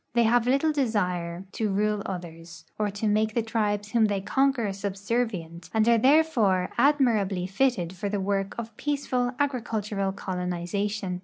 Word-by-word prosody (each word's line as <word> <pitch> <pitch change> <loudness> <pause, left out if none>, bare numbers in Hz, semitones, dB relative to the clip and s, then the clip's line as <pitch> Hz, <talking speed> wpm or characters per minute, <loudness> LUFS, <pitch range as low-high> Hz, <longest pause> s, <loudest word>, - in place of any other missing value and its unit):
They 235 - +5
have 235 +1 +3
little 275 +5 +3
desire 180 - -1
to 220 -2 -1
rule 210 +1 +1
others, 170 -2 -8
or 210 -1 +1
to 205 +2 -3
make 215 +1 +1
the 235 - +1
tril)es 210 -2 -1
Avhom 225 -2 +4
they 200 -1 -1
conquer 265 +3 +1
subserv 200 +5 -1
ient, 170 -4 -8
and 220 0 +3
are 235 -1 +5
therefore 235 -10 +3
admirably 220 -11 +2
fitted 195 -3 0
for 195 +2 -4
the 205 - -1
Avork 195 0 -1
of 230 -1 -6
})eaceful 260 -4 -1
agricultural 220 -8 -1
colonization. 185 +1 -3
210 Hz, 155 wpm, -26 LUFS, 190-235 Hz, -, They